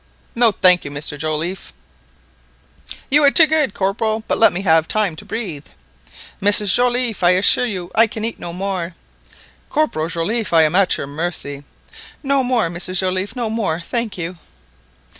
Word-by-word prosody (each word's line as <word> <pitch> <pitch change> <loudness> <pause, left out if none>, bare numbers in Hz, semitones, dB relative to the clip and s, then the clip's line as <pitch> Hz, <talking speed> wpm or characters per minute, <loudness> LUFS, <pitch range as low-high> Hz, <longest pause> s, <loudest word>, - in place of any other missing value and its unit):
"No, 235 -1 +3
thank 180 -2 +4
you, - - -6
Mr 145 +1 -5
Joliffe." 155 +5 -4 1.4
"You 295 +2 +4
are 280 - +7
too 320 +3 +6
good, 310 -8 0
Corporal; 220 +3 -1
but - - -1
let 225 - +6
me 180 - -4
have 160 -4 +2
time 210 -6 0
to - - -11
breathe." 180 -11 -6 0.7
"Mrs 205 0 +5
Joliffe, 245 -3 +1
I 180 +1 +4
assure 205 +6 +4
you, 185 -5 -6
I 225 +1 +4
can 220 0 -5
eat 230 - -5
no 175 - -6
more." 180 -1 -4 0.7
"Corporal 165 - -1
Joliffe, 195 +5 -2
I 165 -1 +6
am 155 - +1
at 190 0 +3
your - - -5
mercy." 145 -1 -5 0.6
"No 275 -1 +1
more, 245 -6 +1
Mrs 180 +2 -3
Joliffe, 185 +3 -1
no 240 -2 -2
more, 215 -7 -2
thank 225 +5 -3
you!" 175 0 -6
190 Hz, 165 wpm, -18 LUFS, 170-230 Hz, 1.4 s, are